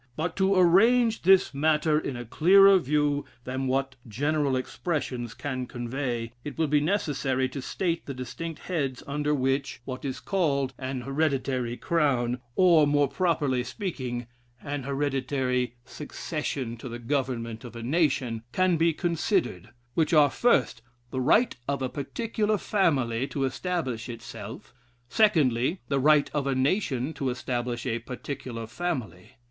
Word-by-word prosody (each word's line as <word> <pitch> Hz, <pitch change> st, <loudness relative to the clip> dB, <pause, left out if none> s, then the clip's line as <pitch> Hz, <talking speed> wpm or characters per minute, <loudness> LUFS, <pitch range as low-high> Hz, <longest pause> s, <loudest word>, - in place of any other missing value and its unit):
But, 165 Hz, +2 st, -2 dB
to 195 Hz, 0 st, +3 dB
arrange 220 Hz, +6 st, +4 dB
this 190 Hz, -2 st, +5 dB
matter 150 Hz, +1 st, +2 dB
in 140 Hz, -, -4 dB
a 120 Hz, -, -6 dB
clearer 195 Hz, -, +6 dB
view 145 Hz, -1 st, +1 dB, 0.2 s
than 130 Hz, +1 st, -3 dB
what 135 Hz, 0 st, -1 dB
general 145 Hz, +4 st, 0 dB
expressions 130 Hz, -, -3 dB
can 130 Hz, -3 st, -4 dB
convey, 120 Hz, -1 st, -3 dB
it 145 Hz, -, -7 dB
will 160 Hz, -, +2 dB
be 150 Hz, 0 st, +3 dB
necessary 145 Hz, -7 st, 0 dB
to 140 Hz, -, -6 dB
state 170 Hz, +4 st, -2 dB
the 140 Hz, -, -4 dB
distinct 155 Hz, +6 st, -6 dB
heads 140 Hz, -8 st, -2 dB
under 150 Hz, +1 st, 0 dB
which 135 Hz, 0 st, -1 dB
(what 130 Hz, -1 st, -6 dB
is 135 Hz, -2 st, -3 dB
called) 140 Hz, -9 st, 0 dB
an 130 Hz, -1 st, -3 dB
hereditary 135 Hz, -3 st, -1 dB
crown, 130 Hz, -7 st, +1 dB
or, 170 Hz, -5 st, +5 dB
more 145 Hz, 0 st, +3 dB
properly 145 Hz, -7 st, 0 dB
speaking, 125 Hz, -, -4 dB, 0.4 s
an 145 Hz, 0 st, -3 dB
hereditary 135 Hz, -3 st, -1 dB
succession 140 Hz, -4 st, -4 dB
to 125 Hz, -, -8 dB
the 120 Hz, -, -5 dB
government 120 Hz, -3 st, -2 dB
of 120 Hz, -1 st, -10 dB
a 115 Hz, -, -6 dB
nation, 130 Hz, -5 st, +1 dB
can 185 Hz, 0 st, +2 dB
be 165 Hz, +1 st, +3 dB
considered; 170 Hz, -, -1 dB, 0.2 s
which 165 Hz, +3 st, +1 dB
are, 145 Hz, -3 st, +6 dB
first, 235 Hz, -, +2 dB, 0.3 s
the 130 Hz, -, -2 dB
right 215 Hz, -, +3 dB
of 140 Hz, -1 st, -1 dB
a 130 Hz, -, -1 dB
particular 215 Hz, -, -1 dB
family 135 Hz, -, +1 dB
to 140 Hz, -, -3 dB
establish 130 Hz, -5 st, -2 dB
itself; 115 Hz, -1 st, -8 dB, 0.4 s
secondly, 155 Hz, -, +3 dB
the 140 Hz, -, +1 dB
right 150 Hz, +1 st, +4 dB
of 145 Hz, -2 st, -1 dB
a 135 Hz, -, +1 dB
nation 135 Hz, -, 0 dB
to 135 Hz, -3 st, -2 dB
establish 120 Hz, -1 st, -3 dB
a 115 Hz, -2 st, -1 dB
particular 120 Hz, -1 st, -6 dB
family. 120 Hz, -, -4 dB
140 Hz, 145 wpm, -27 LUFS, 125-160 Hz, 0.4 s, clearer